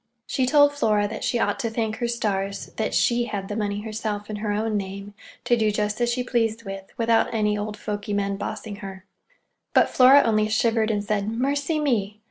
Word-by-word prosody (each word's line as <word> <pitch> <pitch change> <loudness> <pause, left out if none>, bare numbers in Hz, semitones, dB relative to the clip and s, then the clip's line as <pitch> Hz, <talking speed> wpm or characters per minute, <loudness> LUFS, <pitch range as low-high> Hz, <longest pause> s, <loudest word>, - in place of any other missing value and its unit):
She 260 -1 0
told 290 +1 +5
Flora 210 -7 +1
that - - -6
she 240 - 0
ought 235 - 0
to 235 -4 -1
thank 220 -1 -2
her 240 - -1
stars 200 -4 -2
that 220 - -1
she 240 0 +2
had 200 -4 -5
the 205 - -3
money 205 -1 -2
herself 215 -1 -4
in 210 - -4
her 210 0 -2
own 215 +1 -1
name, 200 0 -5 0.3
to 240 - +4
do 220 -2 +2
just 210 +2 -1
as 240 - +2
she 250 +1 -1
pleased 230 -2 0
with, 195 -1 -7
without 230 -1 +2
any 210 -2 +1
old 210 +1 -4
fogy 210 0 -4
men 200 -1 0
bossing 205 +1 -5
her. 195 -2 -9 0.7
But - - +4
Flora 265 +2 +7
only 215 -1 +2
shivered 220 0 +2
and 205 -2 0
said 205 0 -1
"Mercy 280 +7 -1
me!" 215 -8 0
215 Hz, 205 wpm, -24 LUFS, 205-235 Hz, 0.7 s, Flora